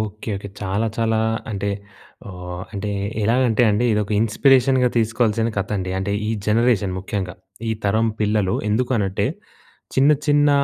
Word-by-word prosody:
Okay. 110 Hz, +1 st, -5 dB
Okay. 100 Hz, +1 st, -7 dB
చాలా, 100 Hz, +3 st, -1 dB
చాలా 115 Hz, -1 st, +1 dB, 0.3 s
అంటే, 100 Hz, -1 st, -2 dB, 0.6 s
ఆహ్, 90 Hz, -1 st, -7 dB
అంటే, 105 Hz, +1 st, -3 dB, 0.3 s
ఎలాగంటే 120 Hz, 0 st, +3 dB
అండీ, 105 Hz, +4 st, +1 dB
ఇదొక 105 Hz, 0 st, 0 dB
ఇన్‌స్పిరేషన్‌గా 130 Hz, +3 st, +4 dB
తీసుకోవాల్సిన 115 Hz, 0 st, +1 dB
కథండి. 95 Hz, -1 st, -2 dB
అంటే, 100 Hz, +1 st, -2 dB, 0.2 s
ఈ -, -, 0 dB, 0.2 s
జనరేషన్ 110 Hz, -3 st, +2 dB
ముఖ్యంగా, 95 Hz, -2 st, -4 dB, 0.4 s
ఈ -, -, +2 dB
తరం 110 Hz, +3 st, +2 dB
పిల్లలు. 105 Hz, -3 st, +1 dB
ఎందుకు 120 Hz, +5 st, 0 dB
అనంటే, 95 Hz, -2 st, 0 dB, 0.7 s
చిన్న 140 Hz, +3 st, +5 dB, 0.2 s
చిన్న 145 Hz, 0 st, +4 dB
110 Hz, 135 wpm, -21 LUFS, 100-115 Hz, 0.7 s, చిన్న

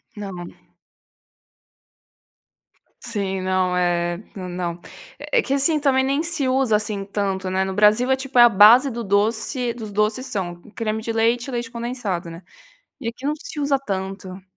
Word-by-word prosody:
Não. 190 Hz, -4 st, -7 dB, 2.6 s
Sim, 200 Hz, -5 st, -3 dB
não 185 Hz, -1 st, 0 dB
é 175 Hz, -1 st, +1 dB, 0.2 s
é -, -, -7 dB
não, 175 Hz, -1 st, -4 dB, 0.4 s
é -, -, +1 dB
que 275 Hz, -, -2 dB
assim 280 Hz, +3 st, +3 dB
também 270 Hz, -2 st, +2 dB
nem 275 Hz, +4 st, 0 dB
se 325 Hz, -6 st, -1 dB
usa 255 Hz, -4 st, +2 dB
assim 205 Hz, -2 st, -2 dB
tanto, 195 Hz, -2 st, -2 dB
né, 190 Hz, +1 st, +1 dB
no 190 Hz, 0 st, -3 dB
Brasil 215 Hz, +5 st, +4 dB
é 265 Hz, -, +4 dB
tipo 265 Hz, -1 st, -1 dB
é 240 Hz, -, +10 dB
a 240 Hz, -, +8 dB
base 225 Hz, +7 st, +7 dB
do 235 Hz, -1 st, -5 dB
doce 220 Hz, +4 st, 0 dB
dos 220 Hz, -3 st, -8 dB
doces 210 Hz, +5 st, 0 dB
são, 190 Hz, -9 st, -3 dB, 0.2 s
creme 220 Hz, -1 st, -3 dB
de 230 Hz, -, -2 dB
leite 230 Hz, +3 st, +1 dB
e -, -, -5 dB
leite 240 Hz, -2 st, -3 dB
condensado, 235 Hz, -8 st, -4 dB
né, 165 Hz, -, -10 dB, 0.6 s
e 230 Hz, -, -3 dB
aqui 250 Hz, +4 st, -6 dB
não 300 Hz, -, +1 dB
se 295 Hz, 0 st, -7 dB
usa 280 Hz, -1 st, +2 dB
tanto. 195 Hz, -4 st, -5 dB
220 Hz, 170 wpm, -22 LUFS, 190-255 Hz, 2.6 s, é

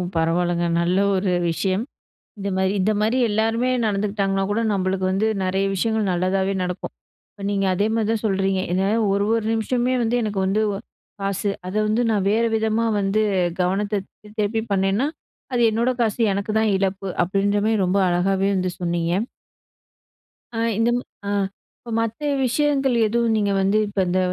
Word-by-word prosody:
பரவால்லங்க. 175 Hz, +1 st, +1 dB, 0.2 s
நல்ல 175 Hz, +2 st, +1 dB, 0.2 s
ஒரு 190 Hz, 0 st, 0 dB, 0.2 s
விஷயம் 190 Hz, +4 st, -1 dB, 0.6 s
இந்த 200 Hz, 0 st, -3 dB
மாரி 190 Hz, 0 st, +1 dB
இந்த 195 Hz, +3 st, +2 dB
மாரி 220 Hz, +4 st, +1 dB
எல்லாருமே 225 Hz, +3 st, +1 dB, 0.2 s
நடந்துக்கிட்டாங்கனா 200 Hz, -2 st, 0 dB
கூட 205 Hz, +2 st, 0 dB
நம்மளுக்கு 190 Hz, -1 st, -1 dB
வந்து 195 Hz, +3 st, +1 dB, 0.2 s
நெறய 190 Hz, +1 st, 0 dB
விஷயங்கள் 220 Hz, +1 st, 0 dB
நல்லதாவே 190 Hz, +2 st, 0 dB
நடக்கும். 180 Hz, 0 st, -4 dB, 0.4 s
இப்ப 200 Hz, -, -10 dB
நீங்க 195 Hz, -1 st, 0 dB
அதே 205 Hz, +3 st, +1 dB
மாரி 225 Hz, -2 st, +1 dB
தான் 225 Hz, -2 st, -1 dB
சொல்கிறீங்க. 195 Hz, -1 st, +1 dB
என்ன 190 Hz, +2 st, +1 dB, 0.2 s
ஒரு 200 Hz, 0 st, +1 dB
ஒரு 225 Hz, -1 st, 0 dB
நிமிஷமே 240 Hz, +3 st, 0 dB
வந்து 230 Hz, +1 st, +1 dB
எனக்கு 210 Hz, -3 st, -2 dB
வந்து 210 Hz, +3 st, +1 dB
வ -, -, -3 dB, 0.5 s
காசு. 195 Hz, +1 st, -1 dB, 0.2 s
அத 185 Hz, -, -5 dB
வந்து 220 Hz, +3 st, +1 dB
நான் 205 Hz, -3 st, +1 dB
வேறு 230 Hz, +2 st, +2 dB
விதமா 220 Hz, +1 st, +1 dB
வந்து 200 Hz, +2 st, +1 dB, 0.4 s
கவனத்த 200 Hz, +3 st, 0 dB, 0.4 s
திருப்பி 215 Hz, +2 st, 0 dB
பண்ணேன்னா 195 Hz, +6 st, +1 dB, 0.5 s
அது 245 Hz, -, +1 dB
என்னோட 230 Hz, +3 st, +1 dB
காசு. 225 Hz, 0 st, -1 dB
எனக்கு 200 Hz, +2 st, -2 dB
தான் 220 Hz, -1 st, +2 dB
இழப்பு. 195 Hz, 0 st, -1 dB, 0.2 s
அப்படின்ற 200 Hz, +2 st, +1 dB
மாரி 220 Hz, 0 st, +2 dB
ரொம்ப 190 Hz, +2 st, +1 dB
அழகாவே 190 Hz, +2 st, +1 dB
வந்து 185 Hz, -1 st, -1 dB
சொன்னீங்க. 170 Hz, -1 st, -1 dB, 1.5 s
ஆ -, -, 0 dB, 0.2 s
இந்த 225 Hz, +1 st, +2 dB, 0.4 s
ஆ -, -, -1 dB, 0.5 s
இப்ப 235 Hz, -, -11 dB
மத்த 230 Hz, 0 st, -2 dB, 0.3 s
விஷயங்கள் 270 Hz, 0 st, +1 dB
எதுவும் 230 Hz, +1 st, +1 dB
நீங்க 205 Hz, -1 st, +1 dB
வந்து 195 Hz, +2 st, +2 dB
இப்ப 200 Hz, -1 st, -4 dB
இந்த 180 Hz, +1 st, +1 dB
200 Hz, 160 wpm, -22 LUFS, 190-220 Hz, 1.5 s, இந்த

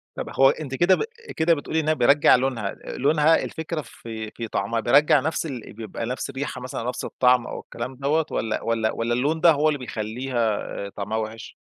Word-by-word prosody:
طب -, -, -5 dB
هو 135 Hz, 0 st, +8 dB
أنتِ 140 Hz, -3 st, -3 dB
كده 175 Hz, +6 st, +4 dB
ب -, -, -2 dB, 0.3 s
كده 165 Hz, +1 st, +3 dB
بتقولي 155 Hz, +2 st, -2 dB
إنّها 155 Hz, 0 st, +2 dB
بيرجع 145 Hz, +1 st, +5 dB
لونها، 125 Hz, -5 st, -1 dB
لونها، 150 Hz, +4 st, +2 dB
الفكرة 160 Hz, 0 st, -4 dB
في 110 Hz, -3 st, -8 dB
في 115 Hz, -, -6 dB
طعمها 110 Hz, +2 st, -1 dB
بيرجَّع 145 Hz, +5 st, +5 dB
نفس 160 Hz, +5 st, -2 dB
ال 130 Hz, -9 st, -7 dB
بيبقى 110 Hz, +1 st, -6 dB
نفس 125 Hz, +3 st, -4 dB
الريحة 135 Hz, -1 st, -5 dB
مثلًا، 125 Hz, -2 st, -5 dB
نفس 125 Hz, -, -3 dB
الطعم 125 Hz, -1 st, +3 dB
أو -, -, -5 dB
الكلام 120 Hz, +3 st, -7 dB
دَوَّة، 145 Hz, +4 st, +1 dB
والَّا 110 Hz, -, -1 dB
والَّا 115 Hz, -1 st, 0 dB
والَّا 115 Hz, +1 st, -1 dB
اللون 145 Hz, +7 st, 0 dB
ده 170 Hz, -, +7 dB
هو 155 Hz, 0 st, +2 dB
اللي 145 Hz, -3 st, -1 dB
بيخلّيها 115 Hz, -1 st, -2 dB, 0.3 s
طعمها 105 Hz, +2 st, -4 dB
وِحِش؟ 110 Hz, 0 st, -6 dB
130 Hz, 190 wpm, -24 LUFS, 115-150 Hz, 0.3 s, هو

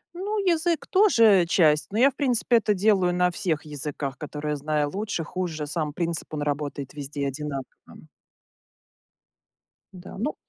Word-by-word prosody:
Ну, 405 Hz, +4 st, -3 dB
язык 335 Hz, -2 st, +1 dB
тоже 230 Hz, -, +5 dB
часть, 150 Hz, -3 st, +3 dB
но 210 Hz, -, -3 dB
я, 265 Hz, +4 st, +5 dB
в -, -, -31 dB
принципе, 245 Hz, -3 st, +2 dB
это 210 Hz, -2 st, +1 dB
делаю 185 Hz, -3 st, +2 dB
на 180 Hz, 0 st, +2 dB
всех 165 Hz, -3 st, -2 dB
языках, 145 Hz, -2 st, -5 dB
которые 150 Hz, 0 st, -4 dB
знаю 150 Hz, 0 st, -1 dB
лучше, 200 Hz, -4 st, -3 dB
хуже. 160 Hz, -2 st, -4 dB
Сам 150 Hz, 0 st, -3 dB
принцип, 170 Hz, +1 st, -3 dB
он 145 Hz, -, -2 dB
работает 145 Hz, -2 st, -3 dB
везде 145 Hz, 0 st, -6 dB
и -, -, 0 dB
одинаково. 140 Hz, 0 st, -4 dB, 2.3 s
Да, 185 Hz, -1 st, -11 dB
ну 250 Hz, +10 st, -2 dB
170 Hz, 150 wpm, -25 LUFS, 150-215 Hz, 2.3 s, тоже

